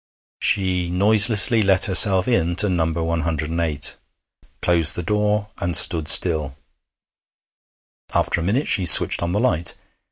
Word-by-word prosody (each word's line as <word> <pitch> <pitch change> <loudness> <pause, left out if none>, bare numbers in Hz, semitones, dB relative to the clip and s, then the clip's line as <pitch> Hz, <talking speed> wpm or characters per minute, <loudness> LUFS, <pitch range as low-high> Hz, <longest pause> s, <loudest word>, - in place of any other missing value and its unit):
She 90 -3 -3
noiselessly 105 +4 0
let 95 -2 +2
herself 95 -1 +3
into 90 -3 -1
No. 85 -3 -3
108, 80 -1 -4 0.6
closed 85 -2 0
the 90 - -7
door, 105 +2 -3
and 85 0 +1
stood 80 -3 +3
still. 75 -6 +3 1.5
After 85 - -2
a - - -6
minute 115 - -3
she 90 -3 0
switched - - +7
on 85 - -5
the 100 - -3
light. 85 -9 -3
90 Hz, 125 wpm, -18 LUFS, 80-105 Hz, 1.5 s, switched